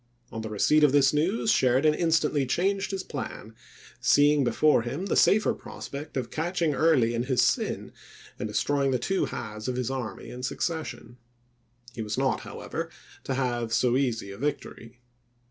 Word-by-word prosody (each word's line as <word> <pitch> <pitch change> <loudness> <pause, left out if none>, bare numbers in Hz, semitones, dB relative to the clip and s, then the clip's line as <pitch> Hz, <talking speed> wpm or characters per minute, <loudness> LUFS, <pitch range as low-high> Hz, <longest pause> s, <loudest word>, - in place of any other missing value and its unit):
On 110 - -5
the 110 - -5
receipt 150 +9 +3
of 145 -2 +5
this 140 -1 +4
news 185 +9 +1
Sheridan 135 - +3
instantly 155 -4 +1
changed 195 +7 0
his 195 -1 -3
plan, 120 -7 -7 0.5
seeing 145 +3 +4
before 130 +3 +3
him 140 +10 -4
the - - 0
safer 210 +1 +4
prospect 140 +1 -8
of 120 -3 -3
catching 165 -1 -1
Early 135 -6 +3
in 120 +1 -1
his 130 -2 +2
sin - - 0 0.5
and 105 - -2
destroying 140 +6 0
the 130 - +1
two 195 +8 0
halves 110 -1 -6
of 125 - -1
his 125 0 -2
army 120 -7 -5
in 125 - -8
succession. 125 -3 -4 0.8
He 115 - -5
was 105 -1 -3
not, - - +1
however, - - -6 0.4
to 135 - -2
have 120 -3 -1
so 125 +1 +2
easy 120 -7 -1
a 100 - -10
victory. 125 -4 -5
135 Hz, 165 wpm, -27 LUFS, 120-155 Hz, 0.8 s, of